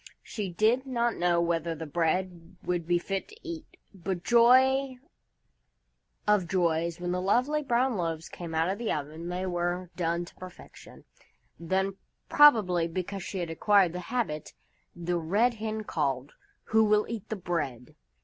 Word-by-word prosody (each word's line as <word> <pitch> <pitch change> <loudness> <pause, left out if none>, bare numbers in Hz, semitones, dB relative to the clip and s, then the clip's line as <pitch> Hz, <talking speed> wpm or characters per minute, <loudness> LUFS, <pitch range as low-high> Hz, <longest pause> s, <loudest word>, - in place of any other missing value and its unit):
She 210 -4 -4
did 225 +9 +2
not 240 -2 0
know 175 -1 +2
whether 170 -1 0
the 160 +1 -6
bread 170 +2 -2
would 175 -2 -2
be 175 0 +3
fit 195 +2 -3
to 430 - -14
eat, 330 -2 -8 0.2
but 185 -1 -4
joy 260 +3 +4 1.3
of 210 -4 +3
joys! 170 -2 0
when 175 0 -2
the 180 0 -1
lovely 255 +10 +2
brown 250 -3 +1
loaves 165 -2 -3
came 170 -2 -7
out 160 +1 +2
of 195 +2 -2
the 235 - -1
oven, 155 +3 -4
they 180 +1 -3
were 175 0 -2
done 170 0 -1
to - - -15
perfection. 185 -1 -13 0.5
Then, 190 +3 -1 0.3
probably 205 - +5
because 185 +3 -4
she 190 - -5
had 170 -1 -4
acquired 190 +1 +3
the 180 - -4
habit, 205 -12 -2 0.4
the 175 0 -2
Red 205 +10 +2
Hen 220 -1 -4
called: 140 -7 -2 0.4
"Who 220 0 +5
will 210 0 +3
eat 225 -4 -6
the 220 - -2
Bread?" 150 - -4
180 Hz, 160 wpm, -28 LUFS, 170-220 Hz, 1.3 s, probably